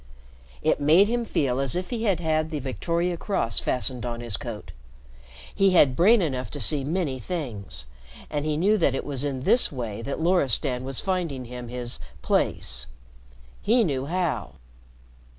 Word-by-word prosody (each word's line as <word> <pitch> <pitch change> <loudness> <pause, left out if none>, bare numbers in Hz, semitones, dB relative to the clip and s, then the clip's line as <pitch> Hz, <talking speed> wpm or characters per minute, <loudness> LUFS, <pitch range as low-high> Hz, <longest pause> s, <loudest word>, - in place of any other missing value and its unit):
It 155 - +2
made 165 +8 +6
him 240 0 0
feel 135 - 0
as 135 +1 0
if 180 +4 -3
he 230 -1 -2
had 195 -5 +2
had 155 -1 0
the 155 - -3
Victoria 170 +6 -1
Cross 115 - -1
fastened 125 -1 0
on 120 -1 -3
his 120 -4 -4
coat. - - -7 0.8
He 195 -1 +3
had 140 -7 +5
brain 200 - +5
enough 130 -7 -2
to 145 - -5
see 140 +3 +2
many 150 -3 -1
things, 115 - -5 0.4
and 145 -1 -2
he 155 -1 0
knew 205 +6 +3
that 140 -6 +2
it - - -3
was 140 -2 -1
in 135 -3 -2
this 240 - +3
way 115 -6 -5
that 140 +5 -4
Loristan 140 -7 +1
was 135 -1 +1
finding 170 -9 -2
him 125 0 -7
his 120 0 -5 0.2
"place." - - +1 0.7
He 235 +2 +4
knew 135 -7 -1
how. 175 0 -1
145 Hz, 170 wpm, -25 LUFS, 125-175 Hz, 0.8 s, made